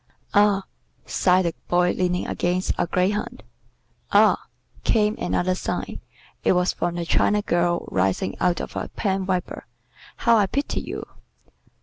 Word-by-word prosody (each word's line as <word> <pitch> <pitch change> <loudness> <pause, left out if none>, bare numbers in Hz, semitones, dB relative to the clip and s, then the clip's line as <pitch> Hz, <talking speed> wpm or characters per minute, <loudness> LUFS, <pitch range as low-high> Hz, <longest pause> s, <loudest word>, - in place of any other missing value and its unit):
"Ah!" 205 -1 +4 0.4
sighed 185 0 +2
the 170 - 0
Boy 175 0 +3
leaning 180 -1 0
against 180 +1 -1
a - - 0
greyhound. 185 +4 -1 0.7
"Ah!" - - +4 0.4
came 215 -1 +2
another 185 +1 0
sigh 185 - -4 0.4
it - - +4
was 180 0 +2
from 175 0 -2
the 170 -1 -3
China 210 +5 +2
girl 175 -1 0
rising 95 0 0
out 180 -1 +2
of - - -6
a - - -3
pen 190 -2 -1
wiper 185 -2 -3 0.5
"how 235 -2 +3
I 205 -2 +3
pity 280 +8 -2
you!" - - -6
180 Hz, 140 wpm, -23 LUFS, 175-200 Hz, 0.7 s, Ah